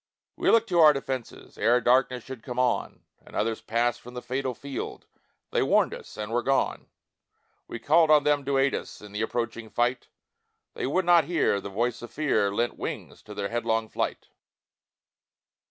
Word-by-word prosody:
We - - +1
looked 230 0 +4
to 175 - +2
our 155 -2 +8
defences 135 -3 -6
Ere 120 +2 +4
darkness 125 0 +2
should 130 -3 -9
come 125 +1 -7
on, 125 -1 0 0.2
And - - -14
others 110 +1 -1
passed 120 +1 0
from 125 +1 -12
the 125 - -5
fatal 130 0 -2
field, 140 +1 -6 0.5
They - - +1
warned - - +3
us, - - -10
and 105 +1 -5
were 120 +1 +1
gone; 135 +2 0 0.8
We - - -6
called 160 +6 +4
on 150 -2 +6
them 145 -1 +2
to 140 0 +1
aid 135 +1 +3
us - - -6
In 105 -1 -11
the 105 +1 -4
approaching 115 0 -3
fight 120 +2 0 0.7
They - - -3
would 180 +6 0
not 175 -3 +5
hear 155 - +1
the 100 - -6
voice 120 +4 -1
of 120 - -8
fear 135 -9 +1
Lent 120 +4 -1
wings - - -6
to 105 - -11
their 100 0 -3
headlong 115 -1 -1
flight. - - -3
125 Hz, 185 wpm, -27 LUFS, 115-140 Hz, 0.8 s, our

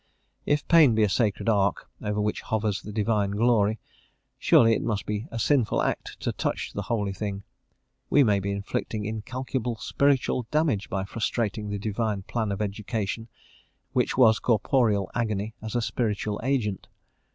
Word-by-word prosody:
If 145 0 +1
pain 155 -9 +6
be 110 - +3
a 105 - +3
sacred 105 +1 0
ark, 100 -4 +1
over 105 0 -2
which 105 0 -1
hovers 105 -3 -1
the 105 - -8
divine 105 -1 +1
glory, 110 0 +2 0.6
surely 115 -1 +5
it - - 0
must 105 -3 -2
be 105 +4 -3
a - - -6
sinful 125 0 +2
act - - -3
to - - -1
touch - - -3
the 100 - -3
holy 105 -2 -1
thing. 100 0 -4 0.7
We 145 - +5
may 105 -5 +3
be 100 +1 -3
inflicting 100 +1 -3
incalculable 120 +2 -3
spiritual 130 -1 +1
damage 150 -10 +1
by 95 0 -1
frustrating 110 0 -2
the 100 - -2
divine 105 -1 -2
plan 110 0 -2
of 100 +2 -1
education, 105 +1 -3 0.7
which - - +1
was 115 -4 +6
corporeal 110 -3 +2
agony 110 -2 -2
as 110 +2 -6
a 120 - +1
spiritual 105 -3 -1
agent. 120 -7 -1
110 Hz, 160 wpm, -26 LUFS, 100-120 Hz, 0.7 s, pain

